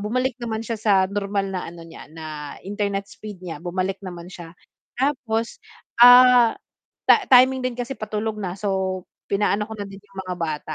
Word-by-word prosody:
bumalik 250 +5 -1
naman 225 -1 -3
siya 230 0 -4
sa 215 -1 +2 0.2
normal 200 -1 -2
na 185 - -4
ano 170 0 -11
niya, 165 - -12
na 155 -2 -7
internet 200 0 -2
speed 205 -4 -10
niya 165 -4 -6
bumalik 185 +2 -2
naman 175 -2 -8
siya. 170 -2 -11 0.4
Tapos, 250 -5 -1 0.4
ah, 245 -1 +8 0.6
ta - - +11 0.2
timing 260 0 +6
din 255 - -3
kasi 245 +2 -4
patulog 215 0 -3
na 185 -4 -4
so 190 -2 -2 0.3
pinaano 205 +1 +1
ko 220 - -7
na - - -3
din 195 0 -11
yung 195 -2 -17
mga 180 - -2
bata. 155 -2 -3
205 Hz, 175 wpm, -23 LUFS, 185-230 Hz, 0.6 s, ta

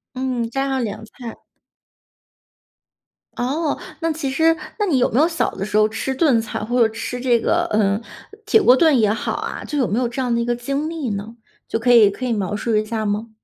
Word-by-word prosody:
嗯， 255 -3 -2
家 270 +3 -1
常 265 -1 -1
凉 215 0 -5
菜。 230 +1 -10 2.0
哦， 290 +5 -1 0.2
那 330 -1 0
其 300 -3 -3
实 325 +5 +3 0.2
那 420 - +1
你 295 -8 +2
有 250 - +2
没 250 - +2
有 320 - +4
小 330 - 0
的 195 - -4
时 210 - -2
候 215 0 +5
吃 225 +5 -3
炖 265 -5 +3
菜， 220 - -5
或 240 +3 0
者 - - -1
吃 230 +2 -5
这 245 -2 +3
个， 345 +8 +1
呃， 205 -1 +2 0.4
铁 435 +1 +4
锅 255 -10 +6
炖 305 -2 +4
也 215 -2 +3
好 225 - -2
啊， - - -5
就 295 - -3
有 255 - +2
没 210 - 0
有 250 -1 +1
这 240 +3 -5
样 250 -2 0
的 235 - +1
一 - - 0
个 240 0 0
经 275 +6 -3
历 315 -7 -4
呢？ 210 +3 -5 0.3
就 - - -1
可 245 +2 +2
以 220 -4 +7
可 230 +6 -7
以 245 - 0
描 205 -2 -2
述 225 +1 -1
一 215 - +1
下 220 +1 -3
儿 215 - -2
吗？ 210 +2 -2
245 Hz, 250 characters per minute, -20 LUFS, 220-275 Hz, 2.0 s, 以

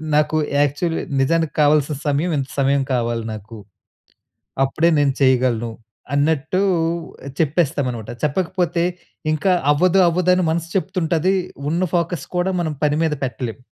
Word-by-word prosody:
నాకు 150 +1 +2 0.3
యాక్చువలీ 145 +4 0 0.2
నిజానికి 160 +1 +1
కావాల్సిన 150 0 +3
సమయం 150 +5 +1
ఇంత 135 - -4
సమయం 140 0 +2
కావాలి 115 -1 -1
నాకు. 110 +1 -9 1.1
అప్పుడే 160 +5 +1
నేను 140 -2 +2
చేయగలను" 125 -3 +2 0.4
అన్నట్టు 160 +4 +1 0.8
చెప్పేస్తాం 150 -3 +1
అన్నమాట. 115 -3 -7
చెప్పకపోతే 175 +2 0 0.5
ఇంకా 185 +5 +1 0.2
అవ్వదు 185 +5 +3
అవ్వదు 180 +2 +2
అని 185 - +1
మనసు 165 0 -2
చెప్తుంటది. 185 -1 0 0.4
ఉన్న 175 +3 0
ఫోకస్ 170 -3 -1
కూడా 185 +2 +1
మనం 155 -3 -2
పని 145 0 +2
మీద 160 -2 +1
పెట్టలేం. 125 -2 -5
150 Hz, 125 wpm, -20 LUFS, 135-170 Hz, 1.1 s, కావాల్సిన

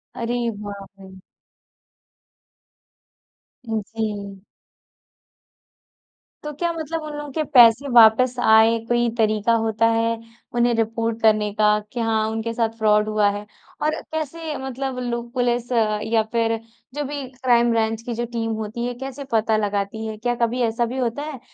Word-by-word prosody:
अरे 240 +1 -2 0.2
बाप 200 -1 -8
रे! 190 -1 -13 2.4
जी। 210 -3 -4 2.0
तो 300 - -4
क्या 340 -1 0
मतलब 325 0 -4
उन 300 -1 -6
लोगों 295 -1 -6
के 310 +3 -1
पैसे 240 +3 +7
वापस 235 +2 +6
आए, 220 0 +5
कोई 240 0 +2
तरीक़ा 215 +1 +2
होता 220 +1 +1
है, 230 0 +1 0.4
उन्हें 240 0 +3
रिपोर्ट 225 0 -1
करने 215 -1 +3
का, 210 0 +3
कि 210 +3 -8
हाँ, 220 -1 +1
उनके 225 +1 -3
साथ 230 -1 +1
फ्रॉड 210 -1 +3
हुआ 210 -1 +3
है? 205 +1 -6 0.4
और 305 +1 0
कैसे 315 0 -4
मतलब 265 0 -4
लोग 235 0 -4
पुलिस 245 0 0
या 220 -1 +1
फिर 230 -1 +1 0.4
जो 295 0 -2
भी 285 -1 -5 0.2
क्राइम 240 -1 +4
ब्रांच 225 0 0
की 240 - -3
जो 240 +1 -2
टीम 225 -1 -2
होती 225 +3 -4
है, 245 - -2
कैसे 270 +2 -7
पता 220 -1 +2
लगाती 205 +1 -2
है? 215 -1 -5
क्या 240 +2 -1
कभी 235 +1 0
ऐसा 230 +1 +1
भी 250 +3 -5
होता 250 +3 -2
है, 300 -5 -6
230 Hz, 150 wpm, -22 LUFS, 220-245 Hz, 2.4 s, पैसे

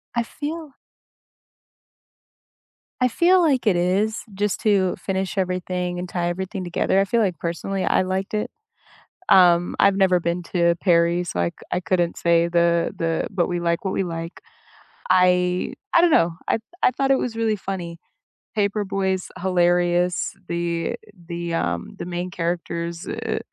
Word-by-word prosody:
I 235 - +2
feel 305 +3 -6 2.3
I 250 - +4
feel 355 +8 +4
like 270 -8 +2
it 190 - +4
is, 195 +5 0
just 205 0 -1
to 200 -5 +2
finish 190 0 -3
everything 180 -1 -2
and 180 0 -5
tie 175 -1 -1
everything 190 +2 -4
together. 180 +2 +1
I 195 - +3
feel 235 +2 +1
like, 185 -6 0
personally, 175 +4 -3
I - - +3
liked 190 +2 -2
it. 210 - -1 0.8
Um, 175 -2 +5
I've 200 0 +4
never 185 -2 +3
been 170 +1 -2
to 170 -1 +3
Paris, 170 -1 +2
so 90 - -2
I 85 0 +1 0.2
I 180 - +1
couldn't 175 -2 0
say 170 0 +3
the 170 0 +2
the 165 -1 -1
but, 185 -4 0
we 175 -1 -1
like 170 +2 -1
what 190 - -1
we 195 - 0
like 165 0 -6 0.7
I 180 0 +3 0.2
I 340 - +6
don't 350 - +5
know, 170 - +4 0.2
I - - +2 0.2
I - - +5
thought 270 +2 0
it 265 - +4
was 230 -2 -3
really 225 -2 +1
funny, 175 -4 -6 0.6
Paper 205 0 0
Boy 195 -1 0
is 185 0 -4
hilarious, 175 0 +1 0.2
the 170 -1 -2 0.3
the, 170 -1 -4
um 85 - -2
the - - -5
main 180 +1 -4
characters, 170 -1 -3
uh, - - -3
180 Hz, 160 wpm, -23 LUFS, 170-195 Hz, 2.3 s, I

